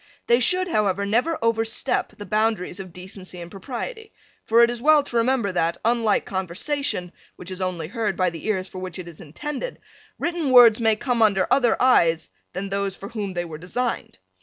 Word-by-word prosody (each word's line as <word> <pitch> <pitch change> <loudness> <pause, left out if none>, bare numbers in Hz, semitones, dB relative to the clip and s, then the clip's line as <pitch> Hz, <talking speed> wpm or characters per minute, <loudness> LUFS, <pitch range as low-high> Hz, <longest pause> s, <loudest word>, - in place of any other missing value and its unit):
They 235 +1 +4
should, 365 +9 +2
however, 200 - +1
never 245 +11 +1
overstep 225 0 0
the 205 - -8
boundaries 215 -3 0
of 185 -2 -8
decency 185 +1 -9
and 170 0 -9
propriety, 425 - -6 0.3
for 230 +1 +5
it 235 - +4
is 240 -1 -6
well 300 +1 +5
to 240 -4 -3
remember 230 -3 +1
that, 170 -2 0
unlike 230 -3 +2
conversation, 190 - -2 0.2
which 180 +1 -10
only 180 -3 -2
is 160 - -11
heard 220 -5 -1
by 185 -2 +2
the 165 +4 -8
ears 190 -3 -1
for 185 - -8
which 185 -1 -6
it 180 -2 -7
is 170 -2 -11
intended, 295 - -6 0.4
written 340 -4 -1
words 245 -3 +8
may 225 -2 +3
come 240 +1 -1
under 200 -4 +4 0.4
eyes 165 - +3
other - - -43 0.2
than 195 +1 -4
those 200 -1 -2
for 200 - -9
whom 205 -4 -4
they 175 0 -2
were 155 -2 -8
designed. 230 - -3
210 Hz, 190 wpm, -23 LUFS, 185-240 Hz, 0.4 s, words